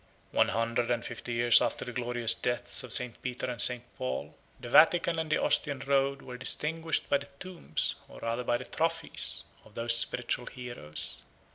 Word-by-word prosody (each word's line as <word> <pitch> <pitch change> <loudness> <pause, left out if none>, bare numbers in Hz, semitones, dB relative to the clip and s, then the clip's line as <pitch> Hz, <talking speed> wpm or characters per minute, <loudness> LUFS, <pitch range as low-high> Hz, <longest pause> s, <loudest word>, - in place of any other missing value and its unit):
One - - +3
hundred 115 +1 0
and 120 -1 0
fifty 120 0 -5
years 120 0 +6
after - - -1
the 125 - -5
glorious 120 -2 +1
deaths 120 +1 0
of 125 - -8
St. 125 0 +3
Peter 125 -1 -4
and 125 -4 -1
St. 125 -1 +3 0.2
Paul, 65 +1 -4 0.2
the 120 - -8
Vatican 165 +5 +5
and 160 -1 -3
the - - +4
Ostian 145 -3 +1
road 140 0 +1
were 125 -1 -8
distinguished 160 +4 0
by 140 - +2
the 140 0 -11
tombs, 180 - -2
or - - -13
rather 115 +2 -2
by 120 0 +1
the - - -8
trophies, 165 0 -1 0.2
of 110 - -19
those 115 0 +2
spiritual 120 +1 0
heroes. 120 - -6
125 Hz, 180 wpm, -30 LUFS, 120-140 Hz, 0.2 s, years